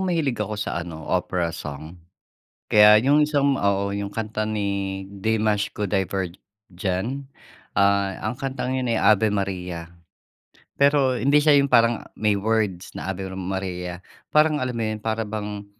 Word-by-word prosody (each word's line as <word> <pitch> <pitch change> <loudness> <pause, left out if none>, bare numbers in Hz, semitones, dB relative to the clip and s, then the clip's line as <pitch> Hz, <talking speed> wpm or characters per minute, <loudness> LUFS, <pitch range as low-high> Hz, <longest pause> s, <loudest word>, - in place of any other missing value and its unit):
mahilig 150 -10 0
ako 105 0 -2
sa 105 -4 -2
ano, 80 -2 -8
opera 90 -2 -1
song. 75 +2 -8 0.7
Kaya 105 0 +7
yung 145 +4 +4
isang 140 -2 +2
oo, 100 -2 +1
yung 100 0 -4
kanta 110 -1 -3
ni 100 -2 -2
Dimash 105 0 0
Qudaibergen. 95 +4 -3 0.5
Ah, 100 0 +2
ang 110 +4 -3
kantang 130 -2 -3
yun 130 - -1
ay - - +1
Ave 105 0 +4
Maria. 90 -4 -3 0.9
Pero 140 -3 +3
hindi 145 +4 +3
siya 145 -1 +6
yung 140 - +3
parang 115 -3 +3
may 105 -2 +1
words 105 -4 -1
na - - -4
Ave 95 0 -4
Maria. 90 -2 -4 0.3
Parang 150 -2 +3
alam 125 -1 -2
mo - - -1
yun, 110 0 -4
para 110 0 -1
bang, 105 -1 -5
105 Hz, 145 wpm, -23 LUFS, 95-120 Hz, 0.9 s, Kaya